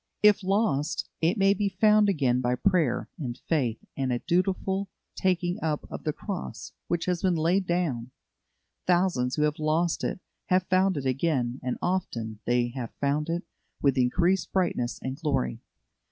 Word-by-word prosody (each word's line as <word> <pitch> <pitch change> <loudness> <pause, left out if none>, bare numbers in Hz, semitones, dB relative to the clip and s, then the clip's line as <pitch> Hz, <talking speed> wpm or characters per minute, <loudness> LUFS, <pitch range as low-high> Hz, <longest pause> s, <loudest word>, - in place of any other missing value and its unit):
If 210 -1 +6
lost, 185 -7 +1
it 170 +7 +2
may 195 0 +5
be 200 0 0
found 210 +2 +4
again 130 -9 +2
by 125 0 +1
prayer 170 -4 +1
and 125 -5 -4
faith 125 -9 0
and 135 -2 -1
a 120 - +1
dutiful 190 +4 0 0.2
taking 180 -1 0
up 155 -2 -1
of - - -7
the 155 - +2
cross 190 +4 -6
which 170 -1 -1
has 180 -2 0
been 185 -2 +2
laid 175 +4 +1
down. 150 -9 -1 0.8
Thousands 175 -9 +2
who 150 - +1
have 150 0 0
lost 160 +2 +1
it - - -2 0.3
have 185 0 +3
found 185 -1 +2
it 135 - -3
again, 130 -2 0
and 125 -1 -2
often 115 - -2
they 120 0 +2
have 120 -2 -6
found 145 +2 0
it 170 +1 -1 0.4
with 140 -2 +3
increased 170 +9 +2
brightness 170 -10 0
and 130 +1 -3
glory. 140 -7 -1
165 Hz, 165 wpm, -27 LUFS, 130-185 Hz, 0.8 s, If